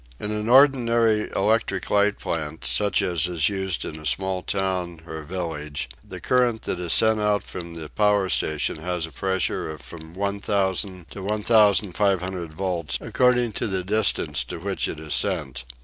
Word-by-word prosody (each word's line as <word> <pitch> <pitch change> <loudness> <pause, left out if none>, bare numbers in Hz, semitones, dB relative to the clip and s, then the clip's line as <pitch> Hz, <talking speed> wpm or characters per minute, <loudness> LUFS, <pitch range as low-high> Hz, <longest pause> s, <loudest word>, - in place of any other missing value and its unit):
In 105 - -4 0.2
the - - +1
ordinary 120 -5 +4
electric 100 -2 +1
light 105 0 +3
plant, 80 -4 -4
such 65 +12 +1
as 85 -2 +2
is 85 -2 +1
used 95 -3 -2
in 80 - -6
a 75 - -10
small 95 -1 -1
town 90 -4 -2
or 80 -1 -6
village, 75 -5 -4
the - - -8
current 125 -3 +1
that 90 - -2
is 85 -2 -3
sent 110 -1 +4
out 105 -2 +1
from 85 -2 -7
the 80 -2 -5
power 105 +2 +2
station 75 -5 0
has 90 -2 -2
a 80 - -11
pressure 95 -4 -1
of 75 -1 -7
from 80 +1 -11
1000 100 -2 -1
to 100 - -8
1500 100 -4 +2
volts, 85 -2 -2
according 125 -2 +2
to - - -2
the 95 -2 -1
distance 105 +4 +1
to - - -6
which 95 +3 -2
it 75 - -6
is 80 -2 -4
sent. 75 -11 -1
95 Hz, 165 wpm, -24 LUFS, 85-105 Hz, 0.2 s, ordinary